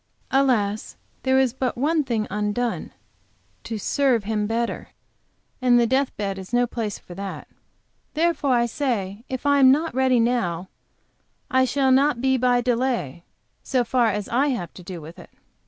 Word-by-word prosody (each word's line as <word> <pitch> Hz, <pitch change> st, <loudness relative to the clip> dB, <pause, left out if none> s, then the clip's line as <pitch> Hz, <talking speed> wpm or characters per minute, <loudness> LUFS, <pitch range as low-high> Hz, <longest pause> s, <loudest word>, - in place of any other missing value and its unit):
Alas, 230 Hz, -7 st, +1 dB, 0.2 s
there 265 Hz, 0 st, +2 dB
is 260 Hz, -3 st, +3 dB
but 255 Hz, -2 st, -2 dB
one 305 Hz, +4 st, +1 dB
thing 230 Hz, -5 st, -1 dB
undone, 210 Hz, +4 st, -2 dB, 0.7 s
to 225 Hz, -, -4 dB
serve 250 Hz, +1 st, +1 dB
Him 210 Hz, 0 st, -1 dB
better; 230 Hz, +1 st, -2 dB, 0.7 s
and 245 Hz, -1 st, +5 dB
the 235 Hz, -, +4 dB
death 265 Hz, +3 st, 0 dB
bed 195 Hz, -2 st, -3 dB
is 190 Hz, +2 st, -10 dB
no 245 Hz, 0 st, +3 dB
place 225 Hz, -4 st, -4 dB
for 175 Hz, -, -13 dB
that. 195 Hz, +2 st, -7 dB, 0.7 s
Therefore 315 Hz, -5 st, +2 dB
I 235 Hz, 0 st, +3 dB
say, 225 Hz, -5 st, -2 dB
if 260 Hz, +1 st, -5 dB
I 285 Hz, 0 st, +4 dB
am 260 Hz, -1 st, +7 dB
not 315 Hz, +4 st, +1 dB
ready 260 Hz, -1 st, +3 dB
now, 190 Hz, -7 st, 0 dB, 0.8 s
I 260 Hz, 0 st, +4 dB
shall 265 Hz, 0 st, +1 dB
not 275 Hz, 0 st, +3 dB
be 265 Hz, +1 st, +2 dB
by 250 Hz, -1 st, +2 dB
delay, 235 Hz, -, -1 dB, 0.4 s
so 255 Hz, -2 st, 0 dB
far 240 Hz, 0 st, +2 dB
as 210 Hz, -1 st, -2 dB
I 265 Hz, +5 st, +2 dB
have 235 Hz, -, -3 dB
to -, -, -11 dB
do 175 Hz, -1 st, -8 dB
with 160 Hz, +3 st, -11 dB
it. -, -, -13 dB
245 Hz, 170 wpm, -23 LUFS, 210-265 Hz, 0.8 s, am